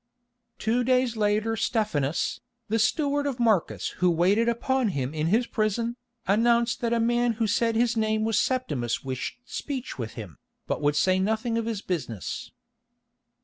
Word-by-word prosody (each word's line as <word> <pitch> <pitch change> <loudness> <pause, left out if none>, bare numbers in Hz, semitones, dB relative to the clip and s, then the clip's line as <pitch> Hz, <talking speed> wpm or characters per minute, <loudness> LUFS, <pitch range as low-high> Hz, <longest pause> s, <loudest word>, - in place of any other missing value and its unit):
Two 235 +3 +1
days 255 -1 +2
later 215 +1 +1
Stephanus, 175 -10 0 0.3
the 225 +2 +1
steward 285 +5 +1
of 265 -3 -3
Marcus 220 -7 +1
who 180 - +5
waited 190 +7 +3
upon 255 +2 +1
him 140 -7 -2
in 155 0 -1
his 225 +7 +3
prison, 230 +2 -1 0.3
announced 235 +4 +2
that 235 -1 0
a 235 - +2
man 240 +1 +2
who 225 +1 -1
said 225 +2 +1
his 240 +1 +2
name 220 -1 +1
was 225 -2 +2
Septimus 150 - -1
wished 130 -1 -4
speech 265 - -5
with 115 -2 -4
him, 100 - -9 0.3
but - - -2
would 145 0 +2
say 185 +5 +3
nothing 220 +4 0
of 230 0 -1
his 220 -3 -3
business. 135 - -4
220 Hz, 160 wpm, -26 LUFS, 180-235 Hz, 0.3 s, who